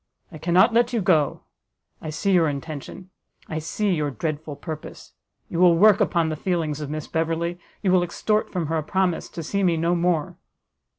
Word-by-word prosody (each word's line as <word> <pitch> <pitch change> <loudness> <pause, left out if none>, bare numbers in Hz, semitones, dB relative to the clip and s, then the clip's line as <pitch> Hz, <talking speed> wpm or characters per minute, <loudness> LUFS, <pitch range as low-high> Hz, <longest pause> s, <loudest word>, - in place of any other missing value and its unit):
I 155 - -10
cannot 180 +8 +4
let 240 +1 +3
you 235 - +1
go: 165 -7 +2 0.6
I 155 - -5
see 155 +6 -1
your 170 -4 +4
intention, 150 +5 -7 0.4
I 155 - -3
see 200 +6 -1
your 150 -3 0
dreadful 150 +3 -4
purpose; 155 +1 -8 0.3
you 170 - -4
will 175 -2 +6
work 210 +2 +6
upon 170 -3 +2
the 155 - -2
feelings 155 -3 -2
of 145 - -5
Miss 155 0 -4
Beverley, 165 +2 -2 0.2
you 190 - +2
will 185 -1 +5
extort 210 +5 0
from 180 -3 -2
her 160 +2 -1
a - - -4
promise 185 +1 0
to 170 - -7
see 200 +6 -1
me 175 -3 +2
no 170 +2 +1
more!" 170 -3 0
170 Hz, 190 wpm, -24 LUFS, 155-185 Hz, 0.6 s, will